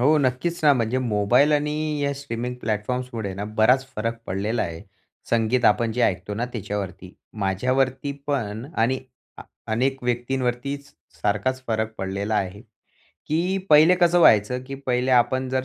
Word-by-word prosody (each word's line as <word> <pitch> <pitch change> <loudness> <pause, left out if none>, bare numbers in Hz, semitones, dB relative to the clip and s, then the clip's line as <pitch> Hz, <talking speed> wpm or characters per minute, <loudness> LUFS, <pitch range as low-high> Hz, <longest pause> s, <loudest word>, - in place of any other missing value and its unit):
हो 150 +5 +4
नक्कीच 140 +6 0
ना, 145 - +7
म्हणजे 120 +1 0
मोबाईल 120 +5 +3
आणि 150 0 +1 0.3
या 140 0 +1
स्ट्रीमिंग 125 -3 -5
प्लॅटफॉर्म्समुळेना 110 -2 -3 0.2
बराच 130 +4 +4
फरक 115 +2 -2
पडलेला 105 +5 -1
आहे. 85 -2 -5 0.5
संगीत 115 +2 +2
आपण 115 -2 +3
जे 125 - 0
ऐकतो 95 -1 0
ना 115 +4 -1
त्याच्यावरती. 95 -4 -5 0.2
माझ्यावरती 130 +8 0
पण 115 -5 -2
आणि 125 +4 +2 0.4
आ - - -7 0.3
अनेक 135 +3 0
व्यक्तींवरतीच 125 +3 -2 0.3
सारखाच 130 +6 0
फरक 110 -1 -1
पडलेला 100 +3 -2
आहे. 100 -1 -2 0.7
की 180 +5 0
पहिले 155 +4 +7
कसं 175 0 +5
व्हायचं, 125 -3 +4
की 135 - -6
पहिले 130 -2 -1
आपण 130 +1 +3
जर 130 0 0
125 Hz, 140 wpm, -23 LUFS, 105-135 Hz, 0.7 s, ना